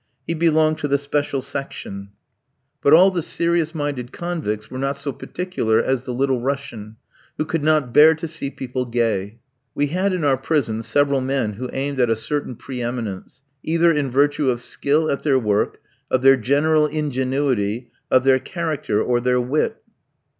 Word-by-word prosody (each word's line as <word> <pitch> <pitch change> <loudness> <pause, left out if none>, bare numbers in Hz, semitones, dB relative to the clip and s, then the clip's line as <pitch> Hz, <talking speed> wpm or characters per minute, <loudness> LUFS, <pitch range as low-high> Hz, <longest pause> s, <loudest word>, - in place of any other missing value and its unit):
He 165 - -2
belonged 155 -1 +2
to 150 - -1
the 140 0 +2
special 145 -1 -2
section. 100 -8 -6 0.7
But 140 - +3
all 180 +5 +7
the 180 -2 -1
serious 170 0 0
minded 145 -5 -3
convicts 150 -12 -4
were 130 - -5
not 135 +1 -1
so 140 0 -2
particular 170 -13 -1
as 130 +1 0
the 125 - -4
Little 130 -1 +1
Russian, 120 -5 -4 0.4
who 155 - -1
could 160 -1 -2
not 150 -5 +2
bear 155 +4 +7
to 160 +1 -5
see 145 -3 -5
people 130 -2 -4
gay. 115 -3 -1 0.4
We 145 0 0
had 190 +2 +1
in 180 -3 -2
our 140 -2 +3
prison 130 -6 -1
several 140 +2 +1
men 130 -5 -1
who 125 +5 -6
aimed 140 0 -3
at 120 -2 +3
a 115 - +3
certain 135 +3 -3
pre 125 +2 -7
eminence, 120 +1 -5 0.2
either 165 +1 +3
in 145 -4 0
virtue 140 +2 +2
of 120 -1 0
skill 145 +5 0
at 140 - -2
their 140 -3 +2
work, 105 -4 0 0.3
of 130 0 +1
their 135 0 +8
general 150 +5 +2
ingenuity, 130 -6 -1 0.2
of 130 - +4
their 130 -1 +4
character, 155 - -2
or 120 -1 +1
their 125 +1 +1
wit. 130 +5 -1
135 Hz, 175 wpm, -21 LUFS, 125-155 Hz, 0.7 s, their